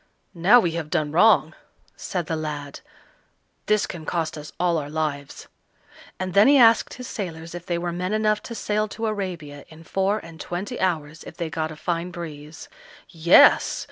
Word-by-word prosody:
"Now 190 +8 +6
we 175 -7 0
have 165 -2 -5
done 150 -1 -1
wrong," 200 +8 +4 0.4
said 180 -4 -4
the 160 - -2
lad; 150 -2 -5 0.9
"this 215 0 +2
can 170 -4 -8
cost 160 0 -2
us 150 0 -9
all 175 -2 +2
our 145 -1 -6
lives;" 145 -2 -4 0.7
and 185 -1 -3
then 200 +4 +6
he 285 0 +6
asked 230 -3 +5
his 250 - -8
sailors 165 -4 -6
if 175 0 -8
they 175 - -1
were 175 0 -3
men 180 +2 -3
enough 215 0 +1
to 235 - -6
sail 215 -1 -1
to 225 +2 -5
Arabia 175 -9 -4
in 160 0 -14
four 195 +5 0
and 165 -6 -10
twenty 180 +3 -5
hours 160 -4 -2
if - - -12
they 170 -2 -4
got 160 -1 -2
a - - -8
fine 170 +2 -3
breeze. 160 -3 -9 0.4
Yes! 170 - +5
170 Hz, 180 wpm, -23 LUFS, 155-200 Hz, 0.9 s, Now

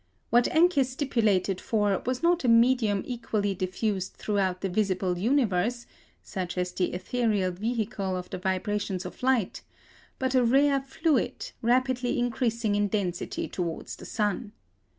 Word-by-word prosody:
What 240 +1 +5
Encke 325 -3 +4
stipulated 225 -8 0
for 205 -4 +1
was 255 +2 -1
not 345 -1 +3
a - - +1
medium 230 -3 +4
equally 220 -5 -2
diffused 190 +1 -2
throughout 190 -3 -1
the 195 - 0
visible 185 -2 0
universe, 235 -1 +1 0.4
such 180 -2 -5
as 180 0 -1
the 180 - -1
ethereal 205 -2 0
vehicle 205 -1 -2
of 180 - -6
the - - -4
vibrations 190 0 -2
of 180 - -9
light, 250 -6 +1 0.6
but 260 0 -1
a 255 -1 +4
rare 275 +3 +4
fluid, 270 -2 -1
rapidly 250 +1 +1
increasing 235 -2 0
in 205 0 +2
density 190 -4 -2
towards 170 -3 -4
the - - -11
sun. 210 +1 -2
215 Hz, 140 wpm, -27 LUFS, 190-250 Hz, 0.6 s, What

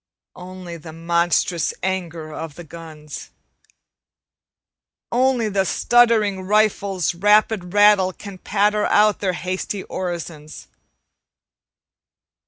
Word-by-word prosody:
Only 180 -1 -9
the 160 0 -11
monstrous 170 0 0
anger 170 -4 -3
of 160 -2 -7
the 175 - -9
guns. 155 -2 -10 1.8
Only 250 -2 +2
the 200 -2 +1
stuttering 220 -2 +2
rifles' 195 -4 +1
rapid 205 0 +2
rattle 205 -2 +5
Can 195 0 -11
patter 210 +2 +1
out 210 0 +3
their 190 -2 -1
hasty 185 +2 -4
orisons. 170 -4 -6
185 Hz, 90 wpm, -21 LUFS, 170-210 Hz, 1.8 s, rattle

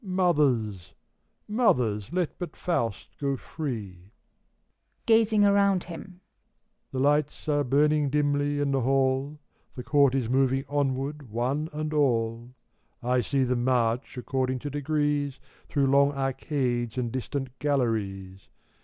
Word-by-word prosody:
Mothers 145 - +1 0.5
I - - -13
Mothers! 120 - +1
let 180 -2 -2
but 175 -4 -6
Faust 115 - -2
go 140 -1 -1
free! 105 - -6 1.0
(Gazing 220 -2 +4
around 200 -2 +3
him.) 180 +1 -10 0.7
The 135 - -5
lights 145 +4 +1
are 145 -1 +2
burning 145 +2 +2
dimly 145 0 +1
in 145 -1 0
the 135 -1 +1
hall, 135 +3 +1 0.4
The 125 - -6
Court 140 0 +3
is 130 -4 0
moving 135 +2 +1
onward, 140 -1 -2
one 130 +8 -1
and 155 0 -4
all: 120 -4 0 0.5
1 125 +1 +1
see 135 +2 0
them 125 -1 0
march, 125 0 0
according 130 +1 -1
to 145 - -5
degrees, 145 -1 -1 0.3
Through 140 -2 +1
long 140 +1 +4
arcades 130 -3 -2
and 120 -2 -1
distant 130 +1 -4
galleries. 105 -9 -2
135 Hz, 125 wpm, -27 LUFS, 125-150 Hz, 1.0 s, Gazing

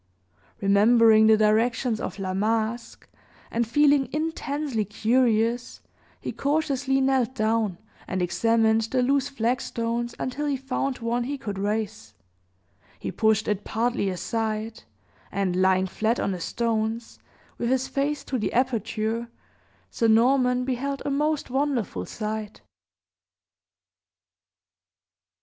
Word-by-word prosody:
Remembering 220 +2 +5
the 220 0 +6
directions 225 +2 +2
of - - -5
La 190 -2 -3
Masque, 220 +3 -2 0.4
and 235 0 0
feeling 285 +1 +3
intensely 295 -6 -2
curious, 230 +2 +1 0.4
he - - -4
cautiously 275 -2 0
knelt 265 -2 +1
down, 220 -5 0 0.3
and 190 - -2
examined 225 +4 +2
the 250 +3 0
loose 275 +2 +1
flagstones 235 -1 -2
until 290 +4 -3
he 280 -2 0
found 270 0 -2
one 240 +1 -1
he 285 +2 -3
could 205 -7 -5
raise; 205 - -3 0.8
he - - -5
pushed 220 -1 +2
it 205 -1 -1
partly 230 -3 -1
aside, 220 +3 -3 0.5
and, 195 -2 -1
lying 190 0 +3
flat 220 +5 -1
on - - 0
the 185 - -4
stones, 225 +2 -2 0.4
with 235 - -1
his 260 0 +1
face 285 +1 -1
to 260 - -3
the 215 - -1
aperture, 230 -2 -1 0.6
Sir 230 - +1
Norman 250 +2 +3
beheld 270 +2 -2
a 285 - -1
most 300 -1 0
wonderful 255 - -1
sight. 215 -1 -5
230 Hz, 120 wpm, -25 LUFS, 215-260 Hz, 0.8 s, the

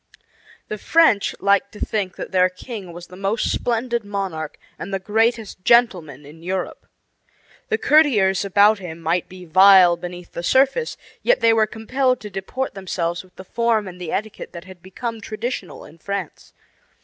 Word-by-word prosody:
The 215 - -5
French, 320 -10 +3
liked 200 +7 +2
to 210 - -11
think 195 -4 -2
that - - -7
their 185 -1 +4
king 190 0 -9
was 175 +1 -10
the 180 - -14
most 195 +4 -1
splendid 235 0 -1
monarch 195 -7 -4 0.2
and 195 - -6
the 195 - 0
greatest 220 0 -1
gentleman 175 - +2
in 155 +3 -14
Europe. 185 +1 -4 0.8
The 445 - +1
courtiers 215 - +3
about 200 +2 +4
him 170 -3 -8
might 165 +2 -1
be 185 -1 -11
vile 185 0 +7
beneath 175 0 -9
the - - -5
surface, 270 - +2 0.2
yet - - +3
they 230 -1 +4
were 220 -1 +3
compelled 255 +4 0
to 210 - -8
deport 195 +8 -4
themselves 175 -3 -3
with 185 -1 -23
the 190 - -11
form 230 -1 0
and 180 -1 -10
the 170 - -5
etiquette 215 +1 -4
that 170 -1 -8
had 185 -1 -14
become 225 +5 -6
traditional 215 -2 -5
in 160 +3 -16
France. 200 -1 -6
195 Hz, 170 wpm, -21 LUFS, 180-225 Hz, 0.8 s, vile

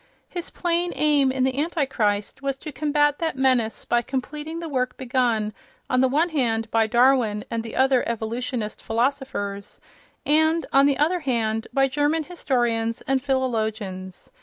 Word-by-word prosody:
His 350 -2 -5
plain 345 0 -1
aim 290 -3 +3
in 260 0 0
"The 260 +1 0
Antichrist" 265 -11 -1
was 275 -1 -2
to 305 - -8
combat 295 +1 +1
that 320 -5 -2
menace 255 -4 +1
by 240 - +2
completing 295 +5 -5
the 335 0 -5
work 255 -4 -2
begun, 240 -4 0 0.4
on 255 - +3
the 260 - +4
one 305 +7 +2
hand, 230 -7 0
by 225 -1 +3
Darwin 240 -3 +3
and 230 -1 -1
the 225 0 -8
other 265 -1 +4
evolutionist 230 0 -3
philosophers, 225 -5 -2 0.5
and, 315 +2 +3
on 275 +1 +6
the 280 - +2
other 335 +5 +2
hand, 225 -6 -1
by 270 -1 +3
German 295 +4 +1
historians 240 -8 -1
and 270 0 0
philologians. 220 -8 -2
260 Hz, 155 wpm, -24 LUFS, 225-290 Hz, 0.5 s, on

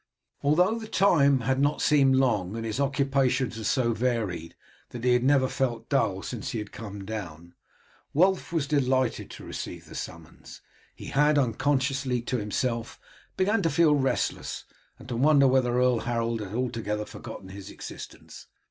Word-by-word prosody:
Although 180 +10 +3
the 220 - -8
time 140 -10 +4
had 130 +3 0
not 145 +2 +1
seemed 135 -3 +4
long, 110 -7 +1
and 115 0 -4
his 110 +3 -3
occupations 135 -3 +1
were 115 - -6
so 120 +2 +1
varied 110 -9 -2 0.3
that 120 -1 -8
he 125 -1 +4
had 125 0 +2
never 135 -1 +4
felt 120 -3 -2
dull 100 -9 +1
since 120 -4 -5
he - - -3
had 105 -1 -6
come 100 -3 -8
down, 85 -6 -7 0.6
Wulf 185 +5 +2
was 165 -4 0
delighted 130 -3 0
to - - -10
receive - - -7
the - - -13
summons. - - -9 0.3
He - - -10
had, 150 +2 +3
unconsciously 135 0 +1
to 125 - -1
himself, 115 +2 -2 0.4
begun 200 +3 +2
to 165 - +1
feel 165 -2 +4
restless, 135 -2 -1 0.3
and 125 0 -14
to 125 - -4
wonder 140 +2 +5
whether 130 -2 +2
Earl 125 -2 +3
Harold 115 -1 -1
had 105 0 -6
altogether 115 -4 -2
forgotten 95 - -9
his 100 0 -9
existence. - - -10
125 Hz, 165 wpm, -27 LUFS, 115-140 Hz, 0.6 s, wonder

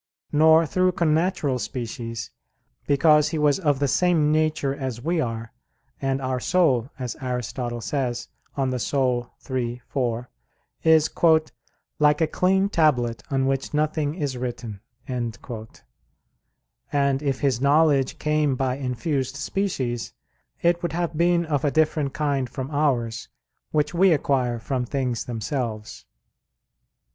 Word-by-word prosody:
Nor 160 +2 +6
through 185 +4 +1
connatural 160 -5 +1
species, 115 0 -5 0.6
because 150 +1 +4
he 160 - -3
was 150 0 +3
of 145 -6 +2
the 140 +1 +1
same 160 -1 +3
nature 155 -3 +1
as 130 -4 -4
we 165 +6 0
are; 115 -3 -4 0.5
and 135 0 0
our 130 -1 -2
soul, 135 -7 +2
as 125 -4 -4
Aristotle 125 -1 -3
says 125 -2 -2 0.3
(De 140 - -1
Anima 125 -1 0 0.2
iii, 120 -1 -2
4), 120 -2 -2 0.5
is 160 -1 +5 0.9
"like 150 0 +4
a 160 - +4
clean 190 +4 +2
tablet 125 - +1
on 135 -1 +1
which 135 +2 -1
nothing 150 0 0
is 145 -7 -2
written." 120 -5 -5 0.3
And 120 -3 -3 1.8
if 140 -3 -1
his 130 -4 +1
knowledge 140 -1 +3
came 150 -2 +1
by 130 0 -1
infused 135 +1 -2
species, 140 -7 -2 0.5
it 170 0 +3
would 170 -2 -2
have 170 -1 -2
been 170 +1 +2
of 150 -2 -1
a 145 - +3
different 155 -2 +1
kind 140 -4 0
from 130 +3 -5
ours, 125 -7 0 0.4
which 150 0 0
we 180 +1 +5
acquire 130 -5 +1
from 125 +2 -2
things 125 -2 -2
themselves. 115 -2 -4
140 Hz, 130 wpm, -24 LUFS, 125-155 Hz, 1.8 s, Nor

